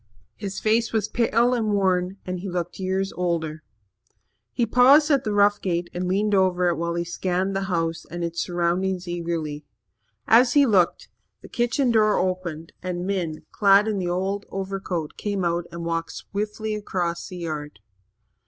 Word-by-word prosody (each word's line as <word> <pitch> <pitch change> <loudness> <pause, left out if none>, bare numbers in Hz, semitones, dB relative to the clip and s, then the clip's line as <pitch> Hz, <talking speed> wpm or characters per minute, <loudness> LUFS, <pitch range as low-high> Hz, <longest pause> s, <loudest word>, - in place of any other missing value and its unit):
His 200 -2 -5
face 225 +2 +1
was 215 -2 0
pale 235 +1 +2
and 220 -4 0
worn 185 -1 +1
and 185 0 -3
he 195 +2 -5
looked 175 0 -4
years 190 +1 -1
older. 165 -3 -2 0.9
He 240 - 0
paused 270 +7 +6
at 275 -3 +3
the 215 - -2
rough 205 0 +3
gate 175 -2 -2
and 180 +1 -2
leaned 205 +3 +1
over 180 -2 +3
it 170 - -1
while 170 +1 -2
he 170 - 0
scanned 185 +2 -2
the 195 0 -1
house 165 -2 -1
and 175 0 -5
its 170 0 -2
surroundings 180 +1 -1
eagerly. 165 -3 -3 0.6
As 240 +2 +6
he 285 -1 +6
looked, 190 -8 +2 0.3
the - - -11
kitchen 240 +1 +1
door 215 -2 +4
opened 180 -3 -3
and 180 -1 -3
Min, 180 -5 -3
clad 200 +1 +5
in 210 -2 -1
the 180 -1 -2
old 190 +3 -2
overcoat, 190 -4 -4
came 200 -3 -2
out 170 0 0
and 170 0 -6
walked 165 0 -2
swiftly 210 +1 -4
across 180 -5 -3
the 180 - -8
yard. 150 - -5
185 Hz, 170 wpm, -24 LUFS, 170-210 Hz, 0.9 s, paused